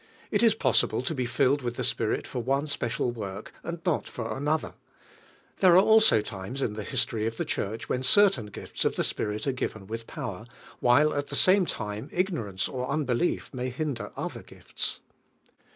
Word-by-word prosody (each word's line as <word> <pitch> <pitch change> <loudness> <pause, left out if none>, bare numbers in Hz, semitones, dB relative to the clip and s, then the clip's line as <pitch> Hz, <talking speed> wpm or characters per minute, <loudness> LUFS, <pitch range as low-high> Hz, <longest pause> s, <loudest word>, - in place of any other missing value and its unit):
It - - +2
is 225 -2 +5
possible 120 - +2
to 130 - -2
be 130 -4 -1
filled 140 +3 +2
will, 120 - -1
the - - -4
Spirit 110 -2 0
for 125 - -4
one 135 +4 0
special 125 -4 -1
work 100 -3 -7
and 170 0 -5
not 175 -5 0
for 115 -2 -4
another, 150 +3 -1 0.9
There 185 -3 +6
are 190 - +7
also 220 - +6
times 105 +6 -5
in 105 - -1
the 105 0 -5
history 110 +2 0
of 115 0 -4
the - - -1
Church 110 +3 -3
when 125 - -1
certain 190 - +4
frills - - -4
of - - +1
(he - - +2
SpMl 105 0 -2
are 140 - +2
given 110 -5 -4
with 115 +3 -6
power, 110 0 -6 0.3
while 140 +5 +4
at 145 0 -2
the - - -3
same 185 -1 +5
finie 105 -1 -4
ignorance 160 - -1
or 130 -1 -4
unbelief 140 +2 0
may 130 0 -2
hinder 135 -1 -3
other - - -4
gifts. - - -5
125 Hz, 185 wpm, -27 LUFS, 110-155 Hz, 0.9 s, are